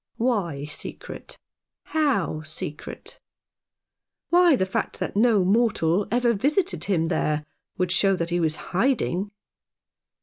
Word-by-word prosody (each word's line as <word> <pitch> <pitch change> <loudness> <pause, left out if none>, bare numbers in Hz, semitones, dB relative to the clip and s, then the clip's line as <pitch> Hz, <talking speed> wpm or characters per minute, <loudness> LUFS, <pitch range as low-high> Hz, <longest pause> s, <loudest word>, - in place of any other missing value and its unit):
" - - -56
Why 190 - -1
secret? 150 - -8 0.5
How 265 - 0
secret? 155 -1 -7 0.6
" - - -64
"Why, 350 -3 +6
the 190 - +1
fact 190 - -3
that - - -3
no 215 -3 +4
mortal 200 -3 +2
ever 240 +1 +2
visited 245 - 0
him 170 -5 +1
there 150 -3 0 0.3
would 180 -1 0
show 195 +1 +4
that 170 -1 -3
he. 175 - +1
was 160 -2 +1 0.2
hiding." 200 -3 +1
195 Hz, 130 wpm, -24 LUFS, 165-240 Hz, 0.6 s, Why